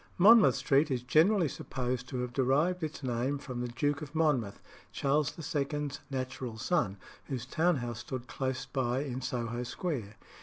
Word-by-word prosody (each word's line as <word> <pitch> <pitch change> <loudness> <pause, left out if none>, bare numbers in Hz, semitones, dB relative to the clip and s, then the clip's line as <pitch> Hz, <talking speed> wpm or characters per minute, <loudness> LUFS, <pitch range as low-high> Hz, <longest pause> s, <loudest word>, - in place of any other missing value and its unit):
Monmouth 215 +4 +7
Street 145 +1 +3
is 125 -3 -1
generally 165 +7 +4
supposed 125 -2 -3
to 125 -3 -2
have 125 -1 -4
derived 145 +8 +2
its 155 -2 -4
name 130 +3 0
from 130 -3 -5
the 125 - -2
Duke 145 +5 -1
of 150 +1 -8
Monmouth, 140 -10 +1 0.3
Charles 145 +2 0 0.2
II.'s 145 0 -1
natural 130 -3 -4
son, 110 - 0 0.3
whose 125 -3 -4
town 170 +6 +2
house 120 -4 -4
stood 120 +1 -5
close 130 0 -3
by 130 -1 -1
in 130 -2 -4
Soho 120 -2 -2
Square. 125 - -4
130 Hz, 160 wpm, -31 LUFS, 125-150 Hz, 0.3 s, Monmouth